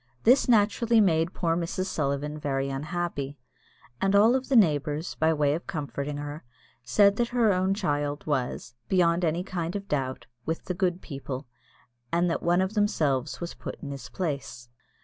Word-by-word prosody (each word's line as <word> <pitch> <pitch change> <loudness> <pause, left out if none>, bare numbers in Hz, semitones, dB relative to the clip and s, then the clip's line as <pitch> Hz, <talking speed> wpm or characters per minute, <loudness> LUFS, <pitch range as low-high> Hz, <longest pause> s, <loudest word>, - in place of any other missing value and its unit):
This 255 +2 +5
naturally 230 +1 +4
made 165 -4 +3
poor 165 -3 0
Mrs. 175 +2 -2
Sullivan 150 -3 -2
very 135 -2 -1
unhappy; 145 -1 -3 0.6
and 195 +1 +2
all 210 +3 +6
the 265 +1 -1
neighbours, 155 - +2
by 160 +1 +2
way 145 -2 +2
of 165 - -4
comforting 145 -2 -4
her, 145 +1 -6 0.4
said 200 - +4
that 240 - +1
her 235 -4 +3
own 185 +1 +1
child 145 -5 -1
was, 130 -4 -2 0.2
beyond 175 -1 +3
any 170 +2 +1
kind 175 -2 -4
of 200 0 -4
doubt, 130 -3 -2 0.2
with 160 +4 -3
the 180 - -2
good 180 0 0
people, 135 -2 -6 0.7
and 170 +1 +2
that - - -1
one 175 +2 +3
of 190 +2 -1
themselves 155 - 0
was 170 0 -5
put - - -7
in 140 - -5
his 135 -3 -7
place. 140 -8 -4
165 Hz, 170 wpm, -27 LUFS, 145-190 Hz, 0.7 s, all